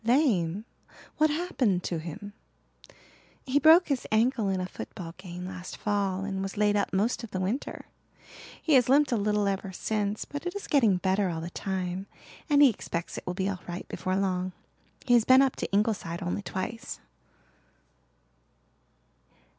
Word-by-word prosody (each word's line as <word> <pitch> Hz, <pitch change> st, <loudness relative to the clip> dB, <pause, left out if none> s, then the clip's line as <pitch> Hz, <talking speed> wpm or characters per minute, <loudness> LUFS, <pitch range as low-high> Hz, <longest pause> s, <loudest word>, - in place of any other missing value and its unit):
"Lame? 220 Hz, -, +2 dB, 0.5 s
What 310 Hz, 0 st, +4 dB
happened 280 Hz, -, 0 dB
to 170 Hz, -, -2 dB
him?" 200 Hz, +6 st, -8 dB, 1.1 s
"He 275 Hz, +2 st, +2 dB
broke 325 Hz, +4 st, +7 dB
his 275 Hz, -3 st, -1 dB
ankle 225 Hz, -1 st, +2 dB
in 190 Hz, -1 st, 0 dB
a 185 Hz, -, -2 dB
football 175 Hz, -2 st, -8 dB
game 180 Hz, -1 st, -7 dB
last 185 Hz, -1 st, -7 dB
fall 200 Hz, -2 st, -1 dB
and 195 Hz, -1 st, -3 dB
was 195 Hz, +1 st, -5 dB
laid 210 Hz, 0 st, +3 dB
up 205 Hz, -, 0 dB
most 210 Hz, +6 st, 0 dB
of 230 Hz, -, -6 dB
the 190 Hz, -, -3 dB
winter. 200 Hz, +9 st, -3 dB, 0.7 s
He 315 Hz, -, +1 dB
has 250 Hz, -2 st, +5 dB
limped 285 Hz, +1 st, +4 dB
a -, -, +3 dB
little 210 Hz, -1 st, +1 dB
ever 195 Hz, -1 st, -2 dB
since 210 Hz, +2 st, -2 dB
but 290 Hz, +4 st, -6 dB
it 355 Hz, -, -4 dB
is 405 Hz, -, -5 dB
getting 230 Hz, -10 st, +3 dB
better 190 Hz, +1 st, +1 dB
all 165 Hz, -2 st, -3 dB
the 170 Hz, +2 st, -6 dB
time 190 Hz, 0 st, -3 dB, 0.4 s
and 290 Hz, 0 st, +6 dB
he 280 Hz, -, +8 dB
expects 170 Hz, -4 st, -5 dB
it -, -, -20 dB
will 180 Hz, -, -2 dB
be 190 Hz, 0 st, -1 dB
all 190 Hz, -2 st, -3 dB
right 175 Hz, +1 st, -6 dB
before 185 Hz, 0 st, -2 dB
long. 185 Hz, -1 st, -1 dB, 0.5 s
He 245 Hz, -, +3 dB
has 235 Hz, -2 st, +6 dB
been 260 Hz, +3 st, +7 dB
up 270 Hz, -, +1 dB
to -, -, -4 dB
Ingleside 200 Hz, -4 st, 0 dB
only 175 Hz, +3 st, -2 dB
twice." 205 Hz, +4 st, -5 dB
200 Hz, 170 wpm, -28 LUFS, 185-245 Hz, 1.1 s, he